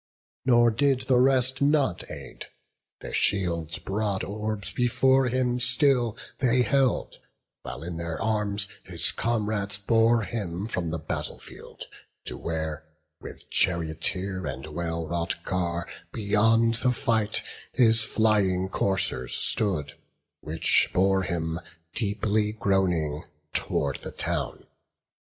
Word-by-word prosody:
Nor 120 -2 +5
did 135 +2 +2
the 130 -1 +2
rest 130 0 +2
not 140 - +1
aid; - - -8 0.5
their - - -7
shields' 85 -5 +1
broad 100 0 -2
orbs 105 0 -4
Before 130 +2 +3
him 125 0 0
still 125 -2 +2 0.2
they 125 -1 +3
held, 135 -1 +1 0.4
while - - -7
in 85 0 -5
their 85 -1 -4
arms 105 -2 0 0.2
His - - 0
comrades 105 -3 -1
bore 115 +2 +3
him 100 -5 -3
from 90 -7 -2
the 80 - -2
battle 80 0 -4
field, - - -11 0.4
To - - -4
where, 80 -2 -4 0.4
with - - -11
charioteer 90 +2 0
and 65 -1 -5
well 80 +1 -3
wrought 85 +1 -3
car, 85 -2 -2 0.2
Beyond 115 +2 +2
the 125 -1 +3
fight, 115 -5 0 0.3
his 115 -3 +5
flying 100 -5 +2
coursers 95 -11 0
stood, 90 -10 0 0.5
Which 80 +2 +2
bore 95 +1 +3
him, 85 -2 -2 0.3
deeply 105 0 +1
groaning, 90 -8 0 0.3
tow'rd - - 0
the - - -8
town. - - -2
105 Hz, 120 wpm, -26 LUFS, 85-120 Hz, 0.5 s, Nor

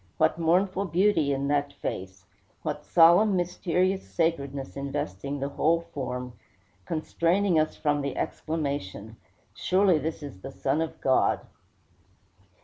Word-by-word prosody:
What 160 +1 +2
mournful 185 +4 +2
beauty 175 -5 +2
in 140 0 -1
that 145 -1 0
face! 95 -1 -6 0.4
What - - -3
solemn, 175 +5 +6
mysterious 180 +1 0
sacredness 140 -5 -1
investing 140 0 -4
the 140 +1 -2
whole 165 +4 +2
form, 125 -2 -4 0.5
constraining 170 +2 +2
from 150 -1 -1
us - - -2
the 140 -1 -3
exclamation, 140 - -3 0.4
"Surely 185 -3 +3
this 160 0 -4
is 135 -10 -9
the - - -7
Son 95 - 0
of 165 - -4
God." 130 -1 +2
155 Hz, 125 wpm, -27 LUFS, 140-175 Hz, 0.5 s, solemn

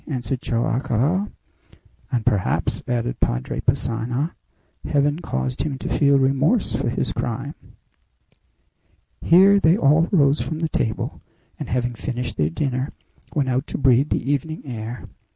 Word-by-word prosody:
answered 130 -2 -3
Joam 120 0 0
Garral. 145 - 0 0.8
"And, 120 -4 -1
perhaps," 105 -6 0
added 120 0 -1
Padre - - -1
Passanha, 125 +7 -1 0.5
"Heaven 145 +1 +1
caused 65 - -3
him 140 -3 -2
to - - -5
feel 140 -1 +4
remorse 135 - +2
for - - -1
his - - -2
crime." - - -3 1.7
Here 195 +4 +6
they 170 0 +4
all 155 +2 +4
rose 145 -5 +4
from 160 - -3
the 160 0 -1
table, 110 -6 -2 0.4
and, - - -5
having 120 0 -1
finished 125 +1 -4
their 75 0 +2
dinner, 130 - -2 0.4
went 140 -3 +1
out 130 +2 0
to - - -4
breathe 135 0 +3
the 140 - 0
evening 155 +3 -2
air. 120 -2 -6
135 Hz, 140 wpm, -22 LUFS, 120-150 Hz, 1.7 s, Here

